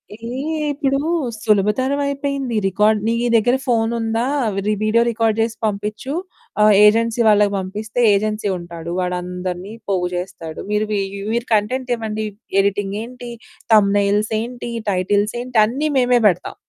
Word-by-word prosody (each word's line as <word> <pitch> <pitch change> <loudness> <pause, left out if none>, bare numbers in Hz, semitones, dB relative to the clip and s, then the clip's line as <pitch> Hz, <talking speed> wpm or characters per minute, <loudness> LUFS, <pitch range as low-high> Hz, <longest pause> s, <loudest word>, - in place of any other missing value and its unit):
ఏహ్! 220 - -19 0.5
ఇప్పుడు 275 -1 0 0.4
సులభతరం 215 +7 +2
అయిపోయింది. 280 -3 -2
రికార్డ్ 210 +3 +2
నీ 230 - +2 0.2
దగ్గర 245 +3 +3
ఫోన్ 225 -2 +2
ఉందా? 225 +1 -1 0.4
రి 215 - +2
వీడియో 220 +2 +3
రికార్డ్ 225 -1 0
చేసి 225 0 -1
పంపించు. 210 +5 -3 0.5
ఆహ్, 210 0 +6
ఏజెన్సీ 230 +2 +3
వాళ్ళకి 210 -1 +4
పంపిస్తే 210 +5 -4
ఏజెన్సీ 210 +1 0
ఉంటాడు. 170 -1 -8
వాడు 180 0 -1
అందరిని 180 +2 -5 0.2
పోగు 180 -2 +1
చేస్తాడు. 175 -3 -6
మీరు 210 +1 +1 0.5
మీరు 235 +1 -1
కంటెంట్ 250 +5 0
ఇవ్వండి. 220 -1 -4 0.4
ఎడిటింగ్ 200 0 -1
ఏంటి, 245 0 -9 0.4
థంబ్నెయిల్స్ 205 +1 +3
ఏంటి, 240 0 -6 0.2
టైటిల్స్ 205 +3 +1
ఏంటి, 250 -1 -4
అన్ని 275 +8 -2
మేమే 250 -1 +4
పెడతాం 180 -2 -1
215 Hz, 135 wpm, -19 LUFS, 200-235 Hz, 0.5 s, ఆహ్